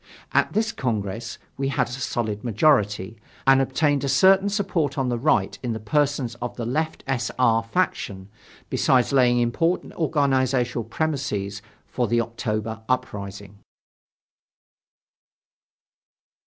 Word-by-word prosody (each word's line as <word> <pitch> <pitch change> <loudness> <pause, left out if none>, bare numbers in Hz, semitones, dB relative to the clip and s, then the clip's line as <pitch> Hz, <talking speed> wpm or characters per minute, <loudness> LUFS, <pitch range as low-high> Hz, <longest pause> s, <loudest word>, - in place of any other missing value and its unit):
At - - +2
this 220 +1 +1
Congress, 115 - -3 0.2
we 135 - -1
had 135 - 0
a - - -9
solid 120 -5 -3
majority, 110 -4 +1 0.3
and 135 0 +6
obtained 140 +1 +1
a 140 - -1
certain 190 +8 +5
support 180 -9 -1
on 130 -2 0
the 120 - 0
right 100 -8 +1
in 120 -2 -2
the 110 - -4
persons 140 +1 0
of 120 - -4
the 120 - -4
left 155 +6 -2
S. 130 -4 -1
R. 115 -3 +4
faction, 115 - -2 0.4
besides 130 +1 +2
laying 125 -2 +4
important 145 +9 0
organizational 130 -6 +1
premises 115 -8 -2 0.2
for 125 -2 -1
the 120 +2 +2
October 110 -1 -3
uprising. 100 -4 -3
125 Hz, 125 wpm, -24 LUFS, 110-140 Hz, 0.4 s, and